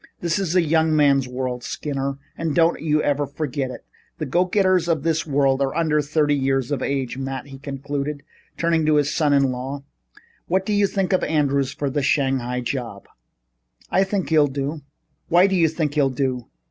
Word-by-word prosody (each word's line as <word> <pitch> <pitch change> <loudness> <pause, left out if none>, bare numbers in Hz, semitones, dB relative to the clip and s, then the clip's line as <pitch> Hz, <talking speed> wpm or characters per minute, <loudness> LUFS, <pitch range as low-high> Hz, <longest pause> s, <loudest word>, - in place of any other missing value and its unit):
This 170 +1 0
is 185 -3 -1
a 180 - +5
young 160 0 +2
man's 140 -3 +3
world, 125 -1 -3
Skinner, 140 0 -3 0.2
and 165 -3 -2
don't 165 0 +3
you 155 -1 +1
ever 145 0 0
forget 140 -2 -3
it. 125 - -9 0.3
The 155 - -3
go 175 +7 +2
getters 185 -2 +2
of 160 -4 0
this 160 0 0
world 135 -1 +2
are 135 -1 0
under 155 -2 +2
thirty 150 0 +1
years 135 -1 0
of 140 -3 -1
age. 135 -2 -2
Matt," 135 0 -4
he 135 -1 -11
concluded, 140 +1 -4 0.3
turning 165 -1 +1
to 155 - +4
his 145 -1 +2
son 150 -3 +2
in 140 -2 +3
law, 135 +3 -5 0.6
"what 190 +2 +1
do 210 - -1
you 205 -1 +3
think 195 -1 -1
of 185 - +2
Andrews 140 -3 +1
for 145 - -3
that 145 - 0
Shanghai 130 -3 0
job?" 120 -5 -4 0.9
"I 190 - +4
think 195 -1 -2
he'll 155 -2 +4
do." 140 +3 -4 0.5
"Why 175 +2 +6
do 195 -1 +1
you 170 -3 +4
think 155 -2 -2
he'll 145 -3 +2
do?" 130 -2 -2
145 Hz, 195 wpm, -22 LUFS, 135-160 Hz, 0.9 s, Why